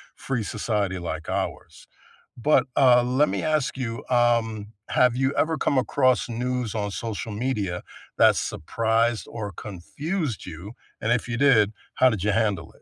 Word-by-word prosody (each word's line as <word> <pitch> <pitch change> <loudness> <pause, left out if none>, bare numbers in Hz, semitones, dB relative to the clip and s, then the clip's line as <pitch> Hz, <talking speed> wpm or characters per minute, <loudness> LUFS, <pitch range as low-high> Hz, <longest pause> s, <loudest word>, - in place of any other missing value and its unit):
free 125 -5 -3
society 100 -4 -2
like 85 - -5
ours. - - -4 0.5
But, 150 +6 +3
uh, 125 -3 +6
let 130 +5 +2
me - - -2
ask 155 -3 0
you, 115 -3 -4
um, 115 -4 +2 0.2
have 125 -2 +3
you 135 +2 +1
ever 160 0 +2
come 140 - +1
across 130 -1 +2
news 125 -1 -2
on 105 -2 -1
social 110 +1 -4
media 105 -6 -2 0.3
that - - +6
surprised 115 +6 0
or 105 -3 -5
confused 120 - -4
you, 90 +4 -8 0.3
and 110 - 0
if 120 -1 +1
you 120 -1 -3
did, 120 -7 +4 0.2
how 130 - +5
did 105 -6 -3
you 105 - +2
handle 100 -6 0
it? - - -24
115 Hz, 160 wpm, -25 LUFS, 105-130 Hz, 0.5 s, uh